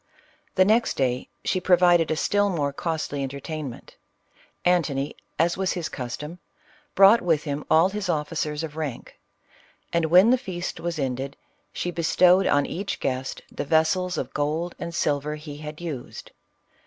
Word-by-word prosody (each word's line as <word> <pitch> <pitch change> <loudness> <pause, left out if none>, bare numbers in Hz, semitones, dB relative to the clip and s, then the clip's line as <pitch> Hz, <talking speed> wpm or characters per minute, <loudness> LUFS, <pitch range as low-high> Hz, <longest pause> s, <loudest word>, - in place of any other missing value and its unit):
The 185 - +5
next 225 +3 +2
day 125 -1 0 0.2
she 185 - 0
provi 180 -1 +5
ded 165 -2 -1
a 160 - +1
still 205 +5 +2
more 145 -6 -1
costly 155 -2 -3
entertainment; 140 0 -6 0.7
Antony, 155 -6 +1 0.2
as 170 +2 +2
was 190 -1 0
his 170 -4 -3
custom, 150 +7 -6 0.6
brought 195 +4 +7
with 160 -4 +1
him 145 -1 -3
all 160 +4 +5
his 200 -1 -4
officers 150 -1 -1
of 155 -2 -6
rank; 150 -6 -6 0.7
an^ 170 -1 +2
when 185 +8 +6
the 255 - +4
feast 185 -3 -5
was 170 -1 -3
ended, 135 0 -3 0.3
she 175 - -3
bestowed 175 +2 +4
on 145 0 +3
each 195 +3 -4
guest 130 0 -3
the - - -4
vessels 170 +4 +1
of - - -4
gold 155 +4 -1
and 170 0 -5
silver 150 0 0
he 150 -1 -9
had 150 0 -8
used. 155 -8 -7
160 Hz, 155 wpm, -25 LUFS, 145-180 Hz, 0.7 s, brought